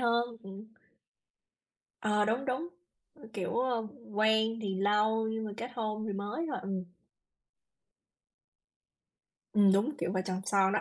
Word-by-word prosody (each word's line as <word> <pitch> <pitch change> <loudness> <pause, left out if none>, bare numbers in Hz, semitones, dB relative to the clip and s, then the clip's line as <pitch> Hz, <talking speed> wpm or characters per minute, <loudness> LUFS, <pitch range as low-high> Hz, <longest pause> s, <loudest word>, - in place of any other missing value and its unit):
hơn. 235 -1 +3 0.2
Ừm. 195 +2 -9 1.3
Ờ, 210 -1 +3
đúng, 235 +5 +1
đúng. 270 +6 -1 0.5
Ừm, 255 -7 -13
kiểu, 205 0 -2
ờm, 245 -3 +1 0.3
quen 220 +1 +3
thì 195 -2 -1
lâu 210 +3 +2
nhưng 220 0 -2
mà 215 - -4
kết 240 +1 -5
hôn 215 -2 -2
thì 205 - -2
mới 205 +12 -2
thôi. 255 - -2
Ừm. 190 -2 -2 2.7
Ừm, 205 -2 +6
đúng 230 +10 +2
kiểu 175 +2 -1
vợ 185 - +1
chồng 185 0 -2
son 195 -1 +4
đó. 215 - +2
215 Hz, 145 wpm, -32 LUFS, 200-230 Hz, 2.7 s, Ừm